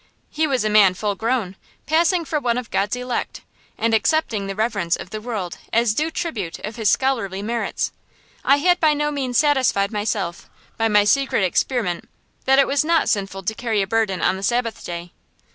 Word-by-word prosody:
He 310 +1 +1
was 260 -5 0
a 215 - +1
man 200 -3 +6
full 205 +2 -1
grown, 220 -3 -1 0.3
passing 335 +2 +2
for 300 +1 -1
one 240 -3 0
of 250 -3 -5
God's 200 +4 0
elect, 250 0 -4 0.4
and 230 0 0
accepting 220 -2 +1
the 195 - -4
reverence 205 -6 0
of 185 - -9
the 215 - -5
world 210 -7 -5
as 230 -1 +2
due 305 +8 0
tribute 215 - -4
to 210 - -6
his 225 -3 0
scholarly 205 -8 0
merits. 235 +2 -2 0.5
I 275 - +5
had 355 +5 +2
by 310 -2 +3
no 295 0 0
means 260 -4 -1
satisfied 265 -9 +2
myself, 205 -4 -3 0.3
by 225 - +1
my 210 -1 +4
secret 270 -1 +2
experiment, 185 0 -1 0.4
that 270 0 +4
it 275 - +6
was 280 +1 +1
not 330 -1 +2
sinful 195 -2 -2
to 220 - -1
carry 220 -3 -1
a - - -2
burden 195 -4 0
on 190 - +2
the - - -7
Sabbath 230 +3 -1
day. 175 0 -6
225 Hz, 195 wpm, -21 LUFS, 200-270 Hz, 0.5 s, man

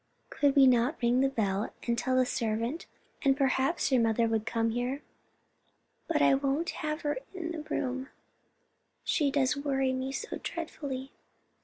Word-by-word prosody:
"Could 285 -1 +2
we 275 -1 +8
not 255 +4 +3
ring 240 +1 +2
the 270 - +3
bell 205 -5 -1
and 235 - +1
tell 255 +2 0
the 255 0 +4
servant, 230 +6 -2 0.3
and 270 -1 +3
perhaps 275 +3 +1
your 255 -2 +4
mother 230 0 +2
would 220 -1 -1
come 230 -1 +1
here?" 250 +5 -2 1.0
"But 320 -3 +2
I - - +6
won't 275 +4 0
have 305 +1 -3
her 290 -3 -1 0.2
in 340 -2 -4
the 325 -2 -4
room; 265 -3 -3 0.9
she 295 -4 +2
does 275 0 +2
worry 270 -2 0
me 260 +1 -2
so 460 +12 -5
dreadfully." 280 -5 -5
265 Hz, 160 wpm, -30 LUFS, 240-290 Hz, 1.0 s, we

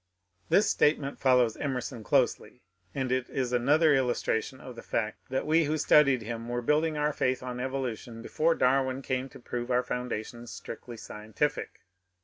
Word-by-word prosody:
This 205 - +4
statement 150 -2 +1
follows 125 -4 +3
Emerson 125 -4 -3
closely, - - 0 0.3
and 130 -2 -1
it 130 -1 0
is 125 -2 -2
another 145 +6 +4
illustration 130 -1 0
of 125 - -10
the - - -8
fact 110 +2 -3
that 130 +1 -1
we 160 +1 +3
who 155 +2 0
studied 140 -5 +4
him 115 +1 -5
were 120 0 -2
building 155 +4 +2
our 150 0 +1
faith 130 -2 0
on 125 -1 -5
evolution 125 -3 -4
before 165 +6 +1
Darwin 130 +1 +1
came 130 +1 -2
to - - -13
prove 120 0 -5
our 125 0 +2
foun 125 0 -3
dations 120 +2 -5
strictly 115 +1 -8
scientific. 110 +9 -3
130 Hz, 165 wpm, -29 LUFS, 120-140 Hz, 0.3 s, This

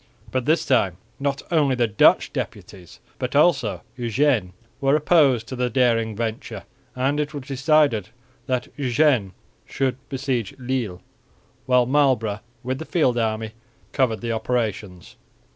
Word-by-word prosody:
But 130 -2 -1
this 160 +3 +2
time 95 -9 +2 0.2
not 140 0 -2
only 145 -6 +3
the 120 -1 +2
Dutch 105 -2 +3
deputies, 90 -4 -7 0.2
but 125 +2 -3
also 125 - +2
Eugene, 120 -4 +1 0.3
were 135 0 +3
opposed 145 -7 +3
to 130 - -6
the 125 0 0
daring 115 -3 +1
venture, 115 0 -4 0.3
and 135 +3 0
it 150 0 -2
was 140 - -5
decided 135 - +2 0.4
that 125 -1 -1
Eugene 130 -6 +2 0.3
should 130 -2 -2
besiege 130 -6 -2
Lille, 120 -8 -3 0.6
while 125 -1 +4
Marlborough 125 -6 +2 0.2
with 130 +2 -3
the 160 - -6
field 130 -9 +1
army 110 -1 -1 0.4
covered 125 -6 0
the 120 -1 -2
operations. 110 -5 -3
125 Hz, 135 wpm, -23 LUFS, 110-140 Hz, 0.6 s, while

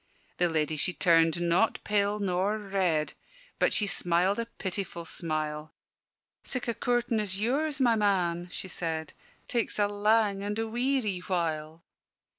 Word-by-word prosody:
The 175 - +3
ladye 155 -1 0
she 180 +5 0
turned 165 -2 +4
not 175 +5 +2
pale 205 0 +1
nor 195 +1 0
red, 190 -7 0 0.5
But - - +3
she 210 - +2
smiled 180 +1 +1
a 230 - -2
pitiful 190 -5 -4
smile: 155 -2 -4 0.7
"Sic' 255 -2 -2
a 235 - +1
coortin' 240 -1 0
as 200 -2 -2
yours, 280 +6 0
my 240 -3 +4
man," 180 -5 +1
she 190 - -5
said 160 -3 -3 0.3
"Takes 235 -2 0
a 205 -1 +3
lang 205 0 +2
and 205 +1 -3
a 225 0 -1
weary 240 -4 0
while!" 165 -3 -2
195 Hz, 145 wpm, -29 LUFS, 170-215 Hz, 0.7 s, turned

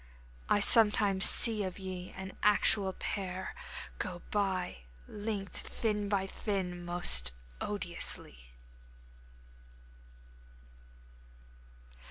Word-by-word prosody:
I 205 - +3
sometimes 210 -3 +6
see 220 -3 +3
of 185 -2 -5
ye 185 -2 -6
an 190 0 -8
actual 205 -1 +3
pair 190 -1 -4 0.5
Go 175 -1 -4
by! 190 - -1 0.3
linked 205 -2 -3
fin 210 -3 -2
by 195 -2 +1
fin! 190 -3 -3
most 175 - +2 0.3
odiously. 170 - -3
195 Hz, 80 wpm, -32 LUFS, 180-205 Hz, 0.5 s, sometimes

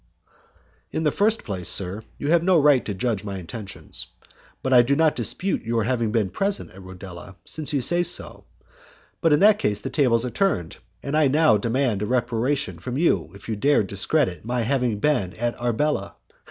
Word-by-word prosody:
"In 160 - -2
the 150 - +2
first 215 +6 +1
place, 95 -4 -2
sir, 95 +2 +3 0.2
you 145 - -3
have 170 -1 +4
no 180 -1 +3
right 145 -3 +4
to 105 - -3
judge 110 -1 -1
of 105 - -10
my 100 -1 -4
intentions, 95 +3 -8 0.6
but 130 - 0
I 125 - +8
do 130 +4 +1
not 160 0 +2
dispute 155 - +1
your 115 0 -1
having 115 -2 -1
been 105 -5 0
present 200 0 -2
at 95 - -13
Rodela, 95 0 -11
since 155 -2 -3
you 140 -3 0
say 175 +7 +2
so; 175 0 -3 0.8
but 165 - +3
in 150 - +3
that 210 +1 +6
case 105 0 0
the - - -6
tables 125 -5 +2
are 125 - -4
turned, 145 - -1 0.3
and 140 - -4 0.2
now 155 0 +4
I - - +4
demand 115 -1 0
a 105 - -2
reparation 125 +3 -1
from 125 0 -5
you 100 - +1
if 100 - -13
you 110 - -2
dare 140 +3 +2
discredit 100 - +1
my 120 +1 -2
having 125 -3 0
been 105 -7 0
at 120 +1 -2
Arbela. 120 -2 -1
120 Hz, 195 wpm, -23 LUFS, 105-150 Hz, 0.8 s, I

